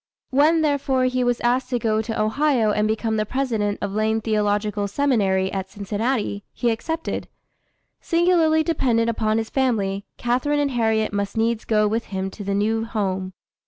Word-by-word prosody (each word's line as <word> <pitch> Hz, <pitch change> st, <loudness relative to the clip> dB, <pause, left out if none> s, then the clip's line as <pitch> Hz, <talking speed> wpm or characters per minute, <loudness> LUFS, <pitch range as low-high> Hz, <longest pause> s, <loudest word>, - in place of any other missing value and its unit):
When, 310 Hz, +4 st, +4 dB
therefore, 275 Hz, -3 st, +1 dB
he 255 Hz, 0 st, +1 dB
was 245 Hz, -1 st, +1 dB
asked 250 Hz, +2 st, +1 dB
to 250 Hz, -, 0 dB
go 220 Hz, -2 st, +1 dB
to 225 Hz, 0 st, -4 dB
Ohio 230 Hz, 0 st, +2 dB
and 210 Hz, 0 st, +1 dB
become 220 Hz, 0 st, -1 dB
the 215 Hz, -, +1 dB
president 220 Hz, -4 st, -1 dB
of 200 Hz, -1 st, -3 dB
Lane 220 Hz, +1 st, +1 dB
Theological 210 Hz, -1 st, 0 dB
Seminary 200 Hz, -6 st, +1 dB
at 190 Hz, -1 st, -3 dB
Cincinnati, 205 Hz, +2 st, -2 dB
he 240 Hz, -2 st, 0 dB
accepted. 320 Hz, +8 st, -3 dB, 0.7 s
Singularly 335 Hz, -2 st, +3 dB
dependent 235 Hz, -8 st, +1 dB
upon 220 Hz, -1 st, 0 dB
his 225 Hz, -1 st, -3 dB
family, 205 Hz, -7 st, 0 dB
Catharine 255 Hz, +5 st, 0 dB
and 285 Hz, -1 st, +1 dB
Harriet 220 Hz, -3 st, +1 dB
must 200 Hz, +1 st, -2 dB
needs 225 Hz, 0 st, 0 dB
go 215 Hz, -1 st, +2 dB
with 225 Hz, +2 st, -1 dB
him 190 Hz, 0 st, -4 dB
to 205 Hz, -, -8 dB
the 200 Hz, 0 st, -1 dB
new 220 Hz, +2 st, +1 dB
home. 190 Hz, -4 st, -2 dB
225 Hz, 165 wpm, -22 LUFS, 205-255 Hz, 0.7 s, When